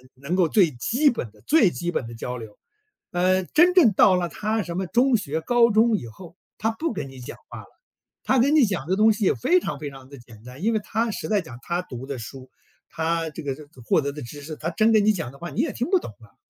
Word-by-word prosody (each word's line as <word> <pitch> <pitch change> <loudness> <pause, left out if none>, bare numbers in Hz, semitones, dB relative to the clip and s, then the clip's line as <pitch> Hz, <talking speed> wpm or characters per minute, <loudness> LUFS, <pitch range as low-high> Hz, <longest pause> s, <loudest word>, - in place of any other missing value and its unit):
能 140 +7 -3
够 185 -3 +3
最 185 -7 +4
基 240 - +1
本 125 - -4
的 105 - -23
最 295 - +4
基 175 0 -3
本 130 - -3
的 115 - -9
交 125 +2 -5
流。 110 -3 -11 0.5
呃， 185 +1 +2
真 350 - +4
正 320 - +6
到 190 0 +5
了 175 -1 -1
他 215 +3 -2
什 170 0 -5
么 190 - -1
中 245 +2 +3
学、 160 -4 -3
高 235 +6 +4
中 220 +1 +4
以 120 - -7
后， 170 +9 -13 0.2
他 225 - 0
不 240 +4 -3
跟 140 -7 -5
你 135 -1 -12
讲 125 - -9
话 - - -8
了， - - -16 0.6
他 260 - +2
跟 280 +6 +3
你 290 - +6
讲 175 -9 -3
的 185 - +1
东 220 +2 +5
西 210 0 -2
也 - - +4
非 350 +9 +2
常 140 - -5
非 150 -1 -5
常 135 -1 -13
地 140 - -11
简 115 -2 -16
单， 125 +5 -11
因 225 +2 +2
为 220 - +1
他 225 +2 -1
实 - - -5
在 210 -2 +1
讲， 145 -9 -11
他 175 +1 -2
读 130 -7 -8
的 140 -2 -6
书， 130 +3 -10 0.4
他 165 0 -1
这 - - -8
个 135 -2 -3
这 150 - -12
个 140 -4 -18
获 115 - +2
得 140 0 -3
的 150 - -8
知 135 +5 -9
识， 155 +2 -7
他 160 - -4
真 220 +5 +2
跟 210 -1 +4
你 215 - +5
讲 165 - -4
的 140 - -15
话 175 - -6
你 140 - -1
也 - - -2
听 245 - -3
不 375 -1 +4
懂 - - -8
啊。 - - -19
175 Hz, 295 characters per minute, -24 LUFS, 140-220 Hz, 0.6 s, 正